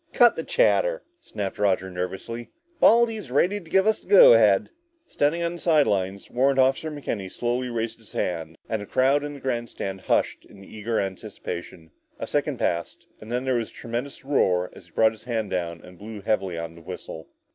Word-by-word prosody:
"Cut 240 -1 +6
the - - -4
chatter," - - +2 0.2
snapped 100 - -5
Roger 95 -2 +1
nervously. 95 +6 -5 0.3
"Baldy's 225 - +4
ready 180 +10 +2
to 165 - -16
give 190 +2 +3
us 220 0 +2
the - - -22
go 200 -10 +9
ahead!" 105 -4 +4 0.3
Standing 165 - 0
on 170 0 -1
the 175 - -8
side 155 -4 +4
lines, 95 0 -2
Warrant 135 +2 +2
Officer 135 +4 +2
McKenny 115 -10 -5
slowly 125 +1 -2
raised 115 -1 -3
his 110 - -17
hand, 85 -2 -3
and 110 -2 -2
the 100 - -8
crowd 135 +3 +2
in 145 0 -5
the - - -10
grandstand 120 -7 -4
hushed - - 0
in 100 - -16
eager 110 +3 -3
anticipation. 90 -3 -6 0.3
A - - -4
second - - -1
passed 85 0 -2
and 110 +2 -10
then 125 +2 -1
there 130 - +1
was 115 -3 -1
a - - -20
tremendous 125 +4 -6
roar 90 -10 +1
as - - -14
he - - -23
brought 110 0 +4
his 110 0 -14
hand 115 -4 -2
down 85 -2 -3
and 90 -1 -15
blew 105 0 -8
heavily 95 -4 -1
on 85 0 -5
the 85 - -14
whistle. 80 -2 -8
115 Hz, 200 wpm, -25 LUFS, 95-140 Hz, 0.3 s, go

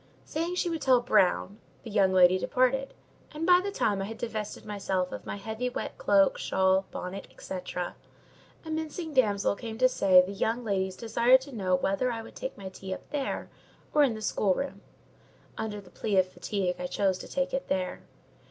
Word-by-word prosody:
Saying 335 +3 -2
she 360 - 0
would 330 -2 -2
tell 255 -2 +5
"Brown," 200 -3 +2 0.2
the 225 - -8
young 200 -2 +4
lady 185 0 +6
departed; 260 +5 +1 0.4
and 310 +2 -3
by 360 0 +6
the 400 - -1
time 205 - 0
I - - -2
had 225 +2 -7
divested 215 -3 -5
myself 195 -3 -2
of - - -7
my - - -3
heavy, 220 +5 -3
wet 250 - -5
cloak, 195 -1 +4
shawl, 190 0 +2
bonnet, 185 +2 -6
&c., - - -7 0.2
a 180 -1 -2 0.8
mincing 315 +1 -4
damsel 205 -7 +2
came 225 0 -7
to 255 +2 +5
say 190 -7 +5
the 190 - -6
young 225 +4 -1
ladies 190 -3 -1
desired 235 +4 +4
to 270 -1 -10
know 185 -4 +1
whether 195 +7 0
I 225 -1 -4
would - - -13
take - - -5
my 190 -1 -7
tea 190 0 -6
up - - -14
there 285 -2 -3 0.4
or 300 - +5
in 260 -6 +3
the 215 - -7
schoolroom. 210 +6 0 0.7
Under 220 -2 -4
the 195 -3 -15
plea 205 -3 -1
of 185 -1 +4
fatigue 185 -2 -2
I 180 - -3
chose 190 -1 0
to - - -8
take 275 0 -2
it 270 - -2
there. 185 -1 -2
215 Hz, 195 wpm, -28 LUFS, 190-260 Hz, 0.8 s, lady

